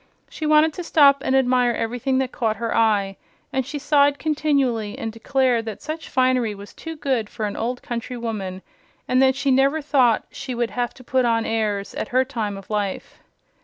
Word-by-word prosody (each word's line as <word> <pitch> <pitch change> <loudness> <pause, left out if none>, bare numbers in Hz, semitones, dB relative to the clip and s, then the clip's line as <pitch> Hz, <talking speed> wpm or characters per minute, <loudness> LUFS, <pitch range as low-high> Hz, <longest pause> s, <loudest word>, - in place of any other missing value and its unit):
She 310 - -4
wanted 305 +1 +4
to 355 - -6
stop 280 -4 +5
and 265 - 0
admire 250 -2 +3
everything 245 +4 -1
that 260 -1 0
caught 220 -2 -1
her 230 +1 -3
eye, 205 -4 +2 0.4
and 265 -1 -1
she 290 - -4
sighed 285 0 +3
continually 280 -9 0
and 225 - -4
declared 240 +1 +1
that 220 -3 -7
such 315 +2 -6
finery 255 -4 +1
was 200 +1 -11
too 325 0 -8
good 260 -8 -1
for 220 -3 -4
an 205 - -4
old 245 +2 -3
country 240 +1 -5
woman, 195 -5 -5 0.4
and 255 +1 +3
that 265 -1 +4
she 275 0 0
never 275 +4 +3
thought 265 -6 +2
she 255 - -6
would 235 -1 -1
have 245 -1 -2
to 255 - -14
"put 255 +1 +1
on 230 -1 +1
airs" 210 -3 -1
at - - -4
her 260 0 +2
time 220 -7 -3
of 195 - -11
life. 205 -2 -3
250 Hz, 200 wpm, -22 LUFS, 225-275 Hz, 0.4 s, stop